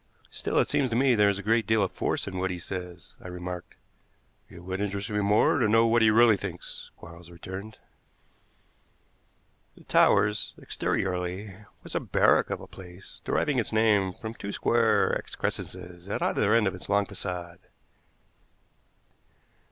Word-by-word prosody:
"Still, - - -3
it - - +4
seems 135 -3 +1
to 115 - -2
me 130 +1 +4
there 105 -3 +4
is 100 - 0
a 100 - -7
great 110 0 +2
deal 110 -2 +3
of 95 - -2
force - - -2
in 95 -1 -4
what 95 0 0
he 90 - -3
says," 90 -1 -7
I - - -9
remarked. 90 0 -7 0.7
"It 85 - -12
would 95 +2 -4
interest 100 +1 -3
me 105 - 0
more 105 +7 +3
to 115 - +3
know 115 +2 +4
what 115 0 +3
he 110 - +6
really 110 -1 +5
thinks," 90 -3 -7
Quarles 85 0 -13
returned. 95 +5 -8 2.0
The - - -16
Towers, 105 0 +2
exteriorly, 90 +2 -3 0.3
was - - -8
a - - +1
barrack - - +3
of - - -3
a - - -9
place, 90 0 -13
deriving 140 -4 +1
its 115 - -2
name 105 -4 +3
from 110 +4 -7
two 100 -3 -6
square 110 -1 +2
excrescences 90 0 -5
at - - -2
either 105 - +1
end 115 -2 +4
of 95 - 0
its 90 - -8
long 100 0 +3
façade. 90 -3 -6
100 Hz, 165 wpm, -27 LUFS, 90-110 Hz, 2.0 s, he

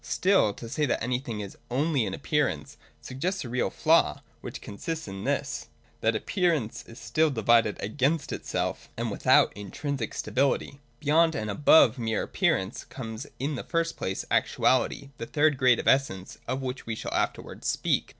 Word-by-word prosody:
Still, 190 - +3
to 115 - -8
say 150 +6 0
that 120 - 0
anything 120 -3 -2
is 100 - -8
ojxly 135 -2 +1
an 95 - -3
appearance - - -1 0.3
suggests 175 +6 -3
a - - -6
real 125 +1 0
flaw, - - +2 0.2
which - - -7
consists 160 +10 -5
in 95 0 -6
this, - - -2 0.3
that 110 0 +1
Appearance 160 - 0
is 115 - -12
still 120 +8 +1
divided 115 -3 +3
against 140 +8 0
itself - - -3
and - - -2
without - - +4
intrinsic 115 +5 -4
stability. 140 +1 0 0.2
Beyond 160 +2 +3
and 110 -1 -2
above 145 +2 +5
mere 110 -2 -1
appearance 95 +4 0
comes 120 0 -7
in 145 +3 -2
the 135 - -4
first 165 -1 -1
place 95 - -3
ActuaUty, 135 +2 +1
the 115 - -5
third 150 0 +3
grade 125 -3 +5
of - - -4
Essence, 115 -9 +1
of 130 +2 -2
which 130 -1 -5
we 115 - -2
shall - - -5
afterwards - - -2
speak. - - 0
130 Hz, 165 wpm, -27 LUFS, 110-150 Hz, 0.3 s, above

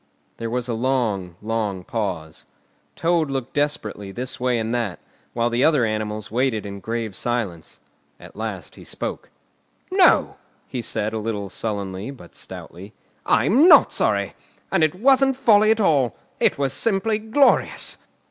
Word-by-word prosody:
There 115 - -4
was 125 +1 -2
a 120 - -2
long, 110 -7 -1
long 105 -4 -2
pause. 90 -8 -4 0.5
Toad 165 -3 +1
looked 135 -2 -4
desperately 110 -9 -2
this 125 +5 -5
way 125 -1 +1
and 115 +1 -2
that, 115 -7 -1 0.4
while 120 0 0
the 120 +2 +1
other 150 -7 +4
animals 110 -1 -3
waited 120 -3 0
in 100 0 -6
grave 115 -1 -4
silence. 110 -10 -3 0.4
At - - -14
last - - -5
he - - -13
spoke. - - -5 0.6
"No!" - - +4 0.3
he 125 - -4
said, 110 -1 -2
a 110 - -2
little 105 -2 -3
sullenly, 100 0 -4
but 125 -11 -12
stoutly; 95 +5 -9 0.3
"I'm 215 - +4
not - - +7
sorry. - - 0 0.4
And - - +3
it 155 +2 +2
wasn't 270 +5 +4
folly 215 -4 +4
at 220 0 +3
all! 140 - +2 0.2
It - - +3
was 135 -1 0
simply 215 +4 +1
glorious!" 225 +6 +2
120 Hz, 150 wpm, -22 LUFS, 105-145 Hz, 0.6 s, not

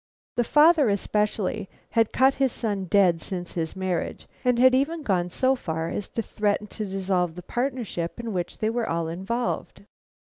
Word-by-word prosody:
The 240 - +2
father, 300 +1 +5
especially, 205 -1 -1 0.2
had 225 -2 +2
cut 265 +1 +4
his 265 -2 +3
son 205 -5 -2
dead 180 -3 +3
since 180 -1 -5
his 165 0 -3
marriage, 185 -3 -3 0.2
and 250 -1 +3
had 255 +1 +6
even 300 +5 +1
gone 180 -5 +1
so 260 +8 +2
far 160 -8 -3
as 205 - -4
to 230 - -3
threaten 210 0 0
to 215 - -4
dissolve 185 -3 0
the 180 - -8
partnership 240 -7 -3
in 230 -2 -4
which 175 -2 -3
they 220 0 0
were 235 -1 -1
all 165 0 -1
involved. 195 +9 -3
205 Hz, 175 wpm, -25 LUFS, 180-245 Hz, 0.2 s, had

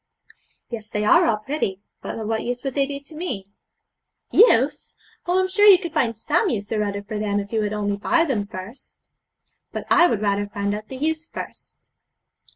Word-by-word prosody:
'Yes, 220 -2 -6
they 210 -1 -2
are - - +6
all 220 - +2
pretty; 215 -5 -3 0.2
but - - -5
of 220 -1 -4
what 225 0 -1
use 245 0 -4
would 270 -2 -3
they 275 0 +1
be 280 0 -5
to 285 +3 -16
me?' 305 - -4 0.9
'Use! 295 - +4 0.3
Oh, 360 +2 +3
I'm 375 - +2
sure 410 +2 +4
you 395 -3 +10
could 340 -4 -6
find 235 -8 +1
some 390 - +1
use 205 -6 -3
or 215 -1 0
other 200 0 -3
for 210 +1 -5
them 205 -1 0
if 200 +2 -6
you 220 - +2
would 210 -1 -1
only 205 -1 -1
buy 330 +11 +2
them 220 -9 -1
first.' 190 +7 -11 0.6
'But - - -5
I 355 -1 +7
would 215 -9 -1
rather 205 0 +1
find 200 0 -2
out 215 +1 -6
the 265 - -8
use 315 +3 -2
first.' - - -10
225 Hz, 205 wpm, -23 LUFS, 205-310 Hz, 0.9 s, you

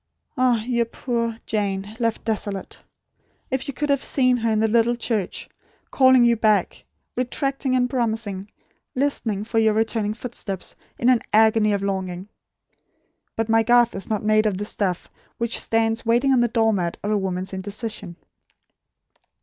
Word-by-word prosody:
Ah, 245 -3 +2
your 235 0 0
poor 230 -2 -3
Jane, 205 0 -2
left 230 -2 -1
desolate! 205 -3 -3 0.7
If 265 +2 -2
you 280 - -3
could 295 - -2
have 280 -1 +1
seen 255 -2 +3
her 230 -1 0
in 215 - +1
the 220 - +3
little 235 +2 +2
church, 225 -5 -2 0.4
calling 260 -2 +5
you 235 0 +4
back; 215 -2 +1 0.3
retracting 265 +1 -1
and 250 -1 +2
promising; 220 -5 -2 0.5
listening 245 -7 0
for 225 +1 0
your 220 -1 +3
returning 220 -1 0
footsteps, 220 -6 -5 0.2
in 240 - 0
an 250 -3 +4
agony 220 0 +4
of 200 -1 -1
longing. 190 -1 -3 1.1
But 225 -1 -1
my 225 0 +4
Garth 240 +1 +4
is 195 - -7
not 215 -1 -1
made 215 0 +3
of 200 -3 -1
the 205 - -3
stuff 190 -4 -2 0.3
which 235 0 0
stands 225 0 0
waiting 240 +4 +3
on 255 - +4
the 240 - +3
door 225 -1 +2
mat 175 -4 -2
of 205 - -1
a 210 - +2
woman's 190 0 -3
indecision." 200 -1 -5
225 Hz, 160 wpm, -23 LUFS, 205-240 Hz, 1.1 s, calling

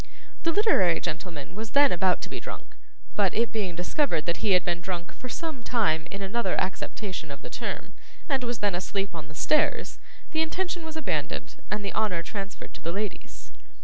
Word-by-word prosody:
The 330 - +3
literary 220 - +5
gentleman 165 -1 -4
was 220 +2 -5
then 285 -1 +8
about 180 +1 +3
to - - -3
be - - -4
drunk, - - -8 0.4
but 200 -3 +3
it 230 +1 +3
being 195 -6 -1
discovered 175 - +1
that 170 - +1
he 210 -3 +3
had 180 - +5
been 175 0 0
drunk 175 -1 -4
for 255 - -8
some 315 -2 -3
time 205 -11 +2
in 200 0 -4
another 195 0 +1
acceptation 185 -3 -3
of 140 - -8
the - - -7
term, - - -4 0.3
and 270 -5 +2
was 240 -2 -2
then 200 - +3
asleep 195 +2 -1
on 160 -4 -6
the 150 - -12
stairs, 305 - +2 0.3
the 315 - +2
intention 350 +2 -1
was 320 0 -5
abandoned, 315 - -2
and 210 -1 -1
the 200 - -2
honour 195 -6 +1
transferred 195 +1 -6
to - - -9
the 170 - -1
ladies. 200 +1 -4
200 Hz, 195 wpm, -28 LUFS, 175-245 Hz, 0.4 s, then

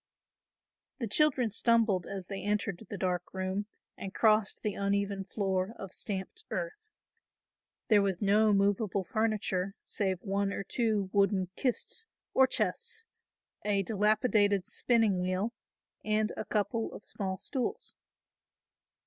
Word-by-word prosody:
The 250 - -2
children 255 0 +3
stumbled 225 -5 +3
as 195 -2 -5
they 195 +1 -5
entered 205 -1 -1
the 205 - -4
dark 180 -2 -1
room 190 +2 -2 0.3
and 195 0 -7
crossed 215 -2 +3
the 210 - 0
uneven 200 0 -1
floor 190 +1 -1
of 195 -2 -7
stamped 200 - -4
earth. 435 -3 -4 1.0
There 210 -2 +6
was 195 -3 0
no 210 +2 +4
movable 200 0 +2
furniture 200 -2 -1
save 190 -3 -1
one 200 0 0
or 195 - -3
two 210 -3 0
wooden 195 -2 +2
kists 275 - -1 0.3
or 265 0 +6
chests, 245 - -1 0.6
a 200 -1 +2
dilapidated 210 -1 +3
spinning 225 -6 +2
wheel 185 +5 -1 0.5
and 215 0 +1
a - - -4
couple 225 +2 -1
of - - -9
small 190 -2 -3
stools. 280 - -3
205 Hz, 125 wpm, -31 LUFS, 195-220 Hz, 1.0 s, There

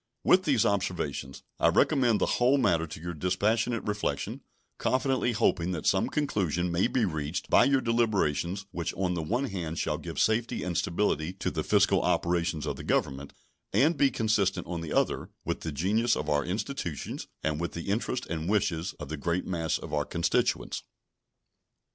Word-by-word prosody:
With 185 0 +5
these 130 -7 +3
observations 90 -10 -2 0.2
I - - +4
recommend 120 -5 +3
the - - +2 0.2
whole 130 +3 +5
matter 85 -10 +2
to 75 - -8
your 85 +2 -5
dispassionate 105 +8 0
reflection, 105 0 -2 0.4
confidently 130 -2 +1
hoping 90 -5 +1
that 80 - -5
some - - +2
conclusion 90 - 0
may 85 +6 +2
be 125 -2 +1
reached 80 -2 -3
by - - +7
your 135 -1 +3
deliberations 100 - 0
which 85 -2 -3
on 90 -2 0
the 85 - -2
one 120 - -1
hand 85 -10 -4
shall - - -1
give - - -6
safety 115 +2 +1
and 90 -2 -3
stability 85 -2 0
to 95 - -3
the - - -2
fiscal - - +3
operations 85 -3 0
of - - -3
the - - -7
Government, 70 +1 -1 0.4
and 155 +5 +4
be 140 -1 +4
consistent, 105 -6 +1
on 85 -2 -4
the 80 -2 -6
other, - - 0 0.2
with - - -2
the 80 - -4
genius 105 - +1
of 75 - -3
our 75 0 +2
institutions 95 - -4 0.2
and 75 -1 0
with 85 - -3
the 85 +3 -5
interests 120 +4 -1
and 80 +1 -3
wishes 90 -5 0
of 75 - -8
the 80 - -4
great 85 +5 -1
mass 85 -3 -1
of - - -9
our 75 -1 +1
constituents. 85 +3 0
90 Hz, 180 wpm, -28 LUFS, 80-115 Hz, 0.4 s, by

